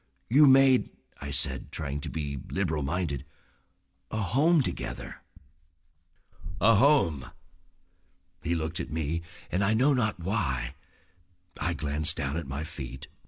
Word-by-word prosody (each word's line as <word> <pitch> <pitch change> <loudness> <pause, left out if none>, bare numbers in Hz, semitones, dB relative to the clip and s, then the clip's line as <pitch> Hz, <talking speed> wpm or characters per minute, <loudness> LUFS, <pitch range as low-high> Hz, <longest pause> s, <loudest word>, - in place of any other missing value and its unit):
"You 145 +4 +7
made," 135 -1 +6 0.3
I 70 - -6
said, 70 - -3
trying 70 -1 -4
to - - -5
be 70 -4 -4
liberal 75 -1 -1
minded, 75 -1 -2 0.9
"a - - -4
home 140 - +3
together." - - -5 1.4
"A 115 +4 +6
home!" 100 - +3 1.1
He 85 +2 -1
looked 80 +2 -3
at - - -4
me, 80 +1 -2 0.3
and, 95 +3 +1
I 105 +3 +2
know 135 +6 +4
not 110 -7 0
why, 70 - -1 0.9
I 85 +3 0
glanced 75 +1 0
down 70 +1 -2
at 85 -3 -4
my 70 +3 -4
feet. 65 -4 -8
80 Hz, 130 wpm, -28 LUFS, 70-110 Hz, 1.4 s, You